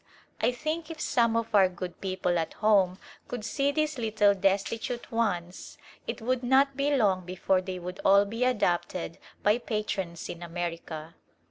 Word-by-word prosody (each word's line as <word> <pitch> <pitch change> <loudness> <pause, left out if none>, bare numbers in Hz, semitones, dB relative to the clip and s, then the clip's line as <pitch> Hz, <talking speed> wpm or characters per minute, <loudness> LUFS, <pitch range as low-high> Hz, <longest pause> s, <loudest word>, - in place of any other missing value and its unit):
I 235 - +3
think 310 +5 -3
if 325 -2 -7
some 235 -6 +2
of 230 0 -2
our 195 -3 +6
good 180 -1 -7
people 185 -2 0
at 160 - -3
home 195 -4 +3 0.3
could 240 -4 -5
see 280 +4 +1
these 305 -2 -1
little 215 -3 +3
destitute 200 +5 -1
ones 185 -6 -2 0.3
it 225 - -4
would 255 +1 0
not 265 +2 +3
be 285 +1 +1
long 195 -7 +2
before 185 +1 0
they 185 0 -5
would 180 +1 -7
all 200 +1 +6
be 230 +4 -2
adopted 185 -6 0 0.2
by 210 +3 +4
patrons 205 -7 -3
in 175 - -7
America. 170 -2 -5
205 Hz, 160 wpm, -28 LUFS, 180-245 Hz, 0.3 s, our